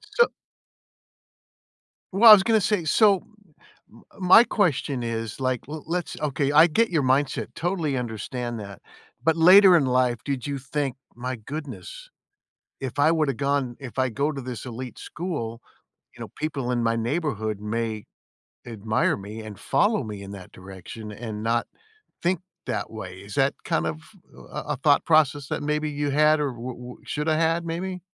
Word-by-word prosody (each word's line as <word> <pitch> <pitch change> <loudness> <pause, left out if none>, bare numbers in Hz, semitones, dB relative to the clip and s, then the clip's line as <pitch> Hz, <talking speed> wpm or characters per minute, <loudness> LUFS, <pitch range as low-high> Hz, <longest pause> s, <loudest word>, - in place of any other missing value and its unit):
So 475 -1 +5 1.8
Well, 225 +4 +8
I - - +14
was 195 -2 +6
gonna 225 -1 +3
say 200 -3 0
so 200 +2 +4 0.7
m - - -17 0.2
my 185 +5 +8
question 145 - 0
is, 115 0 -4
like, 130 -2 0
l 155 0 -6
let's 175 +1 -3
okay, 140 -1 0
I 155 +3 +7
get 225 +8 +2
your 160 -5 +1
mindset, 130 +1 0
totally 165 -5 -1
understand 120 0 -4
that, 100 -3 -9 0.4
but 160 +1 +3
later 185 +3 +8
in 145 - +2
life, 125 -2 +1
did 140 -2 -3
you 140 -1 -2
think, 135 -1 -3 0.2
"My 125 +2 -4
goodness, 150 - -8 0.7
if 130 -1 -5
I 145 +2 +5
woulda 155 -4 +1
gone 140 -2 -1
if 130 -1 -9
I 130 0 +2
go 140 +5 -1
to 140 - -5
this 125 -4 -6
elite 125 0 -7
school, 135 -10 -5 0.6
you - - -12
know, - - -6
people 140 -5 -2
in 120 -1 0
my 115 0 +1
neighborhood 115 - -2
may 110 0 -3 0.6
admire 110 -1 0
me 105 +3 -8
and 105 -2 -9
follow 210 - +1
me 105 -3 -7
in 100 - -9
that 95 -3 -10
direction 95 +4 -10
and 105 0 -6
not 115 +1 0 0.6
think 175 0 +1 0.3
that - - -3
way." 95 -4 -8
Is 100 - -9
that 135 0 +2
kind 165 -2 0
of 155 0 -3 0.5
a - - -3
a - - -7
thought - - +3
process 145 -3 +3
that - - -3
maybe 150 +1 -1
you 145 0 -2
had 150 +2 +4
or 145 -3 -1
wou 120 +1 -7
wou 125 +1 -11
shoulda 155 +1 -1
had 165 +1 +1
maybe? 180 +3 -4
135 Hz, 170 wpm, -25 LUFS, 115-160 Hz, 1.8 s, I